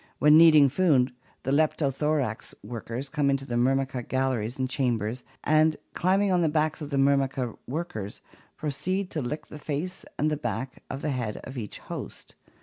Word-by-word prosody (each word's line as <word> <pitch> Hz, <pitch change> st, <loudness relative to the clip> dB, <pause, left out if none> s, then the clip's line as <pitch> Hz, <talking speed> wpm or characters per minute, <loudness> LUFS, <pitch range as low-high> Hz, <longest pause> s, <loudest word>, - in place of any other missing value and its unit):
When 150 Hz, +1 st, +6 dB
needing 155 Hz, -3 st, +8 dB
food 135 Hz, -4 st, +3 dB, 0.3 s
the 135 Hz, -, -1 dB
Leptothorax 145 Hz, -4 st, 0 dB
workers 115 Hz, +4 st, -5 dB
come 145 Hz, -1 st, +1 dB
into 135 Hz, 0 st, 0 dB
the 125 Hz, -, -5 dB
Myrmica 130 Hz, +1 st, +1 dB
galleries 130 Hz, -3 st, -1 dB
and 130 Hz, -1 st, 0 dB
chambers, 125 Hz, -3 st, -1 dB, 0.2 s
and, 155 Hz, +1 st, +4 dB, 0.2 s
climbing 190 Hz, +2 st, +2 dB
on 180 Hz, -, +3 dB
to 165 Hz, -, +3 dB
the -, -, 0 dB
backs 155 Hz, 0 st, +1 dB
of 150 Hz, -, -5 dB
the 140 Hz, -, -1 dB
Myrmica 135 Hz, -3 st, +2 dB
workers, 125 Hz, -, -4 dB, 0.4 s
proceed 180 Hz, +7 st, -2 dB
to 155 Hz, -, -2 dB
lick 140 Hz, +5 st, -4 dB
the 150 Hz, -, -10 dB
face 155 Hz, +6 st, -4 dB
and 155 Hz, +1 st, +1 dB
the 150 Hz, -, 0 dB
back 120 Hz, +1 st, -4 dB
of 135 Hz, -, -5 dB
the 150 Hz, -, 0 dB
head 120 Hz, -5 st, -2 dB
of 130 Hz, -, -8 dB
each 110 Hz, -5 st, -5 dB
host. -, -, -8 dB
140 Hz, 175 wpm, -27 LUFS, 125-155 Hz, 0.4 s, needing